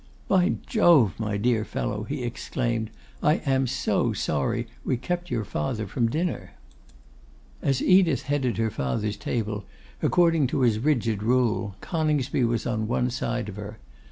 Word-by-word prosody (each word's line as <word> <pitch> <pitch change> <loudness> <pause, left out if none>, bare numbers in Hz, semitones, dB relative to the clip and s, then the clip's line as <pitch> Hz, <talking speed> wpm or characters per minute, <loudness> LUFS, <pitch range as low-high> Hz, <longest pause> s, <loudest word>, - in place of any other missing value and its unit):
'By 185 +1 +3
Jove! 165 - +5
my 105 -2 -1
dear 110 +1 +1
fellow,' 105 0 -3
he 140 -1 -4
exclaimed, 115 -1 -2 0.3
'I 150 - +4
am 135 -1 +2
so 135 +2 0
sorry 115 +11 -1 0.2
we 130 - 0
kept 175 +8 -3
your 115 -6 -1
father 105 +7 -2
from 115 +3 0
dinner.' 165 +6 -2 1.1
As 135 -2 +1
Edith 180 -7 +4
headed 135 -3 0
her 115 -1 0
father's 100 +10 -2
table, 105 0 -3 0.4
according 165 -5 +3
to 130 - -1
his 115 -4 +3
rigid 115 -6 +1
rule, 115 -3 +1
Coningsby 150 -5 0
was 115 0 -1
on 110 -3 -1
one 125 +1 0
side 120 -1 -2
of 105 -1 -7
her. 105 +1 -7
120 Hz, 150 wpm, -26 LUFS, 110-140 Hz, 1.1 s, Jove